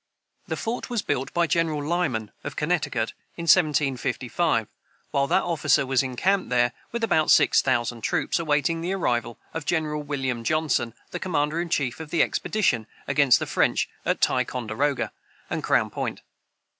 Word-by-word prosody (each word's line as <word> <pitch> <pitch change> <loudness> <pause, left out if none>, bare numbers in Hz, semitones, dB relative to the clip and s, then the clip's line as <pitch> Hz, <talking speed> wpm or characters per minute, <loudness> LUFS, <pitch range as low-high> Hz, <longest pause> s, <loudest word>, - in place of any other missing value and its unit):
The - - -3
fort 230 +3 -3
was 235 -4 -1
built 130 - -2
by 170 0 +2
General 160 -3 0
Lyman, 145 -10 -1
of 145 - -6
Connecticut, 150 -8 -1 0.2
in 170 - -5
1755, 145 - +2 0.4
while 140 0 +1
that 190 - +2
officer 165 -5 +2
was 130 -1 +2
encamped 180 +10 0
there 120 -1 +3 0.2
with 235 0 -3
about 160 -8 +2
six - - +6
thousand 120 -3 0
troops, - - 0
awaiting 160 +1 +1
the 180 +3 -1
arrival 120 -10 -1 0.2
of 160 - -4
General 155 -3 0
William 135 -5 -3
Johnson, 140 -5 0 0.2
the - - -4
commander 155 -2 0
in 175 - -4
chief 135 -5 -1
of 160 -2 -7
the 170 - +3
expedition 125 - 0 0.2
against 140 -3 +5
the - - -3
French - - +1 0.2
at - - 0
Ticonderoga 125 +4 0 0.4
and - - -1
Crown - - +2
Point. - - -4
145 Hz, 155 wpm, -25 LUFS, 125-170 Hz, 0.4 s, six